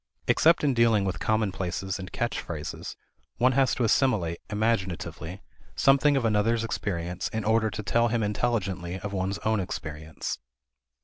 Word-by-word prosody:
Except 165 +1 +4
in 140 -2 +3
dealing 115 -4 +3
with 90 -4 -2
commonplaces 95 -2 -1
and 95 -1 -7
catch 120 0 -2
phrases 75 -3 -6 0.4
one 130 +2 +4
has 135 0 +3
to 125 - 0
assimilate, 105 -8 +2
imaginatively, 95 -5 -2 0.3
something 140 - +4
of 130 - 0
another's 110 +1 +2
experience 90 -5 -3
in 110 -1 -3
order 110 0 +3
to 105 +1 -5
tell 115 +4 +2
him 115 -1 0
intelligently 100 -5 -1
of 100 0 -5
one's 95 +1 -1
own 110 -1 +2
experience. 80 -4 -5
105 Hz, 145 wpm, -27 LUFS, 95-115 Hz, 0.4 s, Except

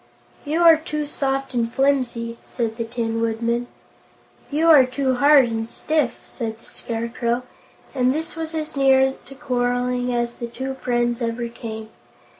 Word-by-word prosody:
"You 310 +4 0
are 330 -2 +8
too 300 -1 -3
soft 270 -2 -2
and 235 -1 0
flimsy," 245 -4 0
said 230 -2 -3
the 230 - -2
Tin 225 -1 -2
Woodman. 230 +1 0 0.8
"You 310 +3 +1
are 290 -4 +9
too 260 +1 0
hard 285 0 +6
and 225 -1 -3
stiff," 300 -4 -1
said 225 -3 -5
the 230 - -22
Scarecrow, 235 +1 -3 0.5
and 255 -2 +2
this 320 +5 -3
was 325 0 -4
as 310 -1 -4
near 265 -1 +4
to 270 - -11
quarreling 250 -2 0
as 240 -1 -1
the 235 - -6
two 265 +3 -5
friends 240 0 0
ever 235 +1 -2
came. 220 -2 -7
245 Hz, 155 wpm, -22 LUFS, 235-275 Hz, 0.8 s, are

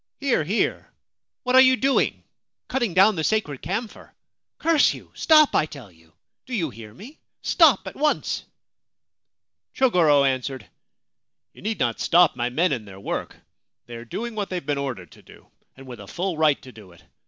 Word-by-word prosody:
' - - -58
Here, 270 - +1
here! 200 +9 -2 0.5
What 255 -1 0
are 260 - +9
you 260 0 +5
doing? 270 +1 0 0.4
Cutting 240 -9 -2
down 195 +3 +5
the 160 - -2
sacred 155 -9 -1
camphor? 210 +7 -5 0.5
Curse 325 -3 +3
you! - - -14
Stop, 310 -2 +4
I 155 - +2
tell 130 -10 -12
you! 80 -1 -25 0.4
Do 255 - -4
you 165 - -2
hear 110 -1 -12
me? 230 - -14 0.2
Stop 275 - +4
at 190 - -8
once! 300 +1 -1 0.6
' - - -54
Chogoro 170 - +3
answered: 130 -3 -2 0.4
' - - -62
You - - -16
need 215 +1 -3
not 115 -2 -1
stop 175 -1 +4
my 120 +1 -2
men 165 +7 +1
in 120 -6 -3
their 95 -1 -12
work. - - -5 0.5
They 120 - -12
are 115 - -8
doing 230 - -6
what 205 -2 -4
they 185 - -4
have 175 - -7
been 145 -1 -1
ordered 120 - -5
to - - -17
do, - - -18 0.3
and 135 - -13
with 125 -3 -10
a 100 - -11
full 180 - -3
right 155 -2 +2
to 130 - -12
do 105 -6 -15
it. 85 - -21
165 Hz, 195 wpm, -23 LUFS, -, 0.6 s, are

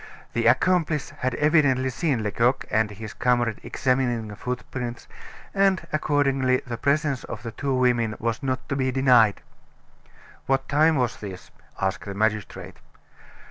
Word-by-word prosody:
The 115 0 +1
accomplice 155 +3 +2
had 130 -1 -3
evidently 145 -4 +3
seen 135 -5 -1
Lecoq 115 +5 +1
and 110 0 +2
his 105 +1 -8
comrade 120 -3 +1
examining 125 -4 0
the 105 - -8
footprints, 125 0 -5 0.5
and 195 -3 +2
accordingly 135 -4 +1
the 120 - -4
presence 140 -1 0
of - - -7
the 115 - -5
two 135 +3 -2
women 120 -4 +1
was 115 0 -2
not 130 -2 -3
to 140 - -1
be 130 -1 0
denied. 125 -5 +4 1.1
"What 135 0 +1
time 155 +3 +3
was 125 -4 0
this?" 95 -3 -9 0.3
asked 95 -1 -2
the 100 -1 -6
magistrate. 110 -1 -2
125 Hz, 140 wpm, -24 LUFS, 115-140 Hz, 1.1 s, denied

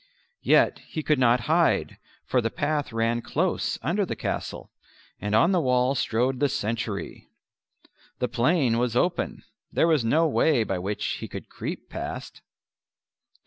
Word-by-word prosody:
Yet - - +4
he 155 - -4
could 150 -2 +2
not 120 -1 +4
hide, 160 +5 +1 0.3
for 125 - +1
the 115 - -1
path 145 +3 -1
ran 115 +1 0
close 170 +9 -1
under 195 +5 +1
the 185 - -3
castle, - - -4 0.5
and 105 +2 -1
on 170 - +5
the 180 -3 +3
wall 125 0 +2
strode 125 0 0
the 145 0 +2
sentry. 110 -4 -3 0.9
The 125 - 0
plain 125 -2 +2
was 120 -1 0
open; 175 +7 0 0.3
there - - +3
was 155 -6 +3
no 155 +9 +3
way 145 -4 +3
by 95 -4 -2
which 100 +3 -3
he - - -6
could - - -8
creep - - -6
past. - - -6
125 Hz, 150 wpm, -26 LUFS, 115-155 Hz, 0.9 s, on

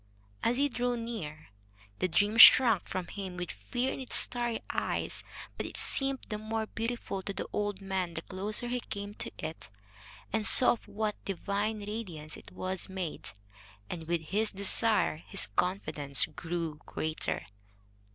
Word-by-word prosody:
As 240 +2 +1
he 285 +1 +3
drew 245 -2 -1
near, 185 - -6 0.5
the - - +2
dream 205 +5 +2
shrank 225 -4 +9
from 185 -1 -3
him, 190 -2 -6
with 180 -1 -4
fear 245 - -2
in - - -6
its 260 - -1
starry 240 -2 +1
eyes; - - -2 0.3
but - - -3
it - - -9
seemed 270 -1 0
the 210 - -3
more 220 +1 -2
beautiful 230 -3 -4
to 200 - -4
the 195 - -4
old 205 -1 -1
man 190 -3 -2
the - - -4
closer 205 +5 -2
he 250 +1 -1
came 205 -3 -6
to - - -6
it 155 -10 -6 0.6
and 220 -2 +4
saw 255 - +9
of 240 - -4
what 210 +1 -3
divine 205 +3 -2
radiance 180 -8 -6
it - - -13
was 185 0 -4
made; 185 -4 -5 0.6
and, 160 -2 -6
with 170 -1 0
his 205 +7 -1
desire, 200 -2 +1
his 185 +4 0
confidence 155 -7 +1
grew 165 -3 -4
greater. 155 0 -2
200 Hz, 160 wpm, -31 LUFS, 175-225 Hz, 0.6 s, shrank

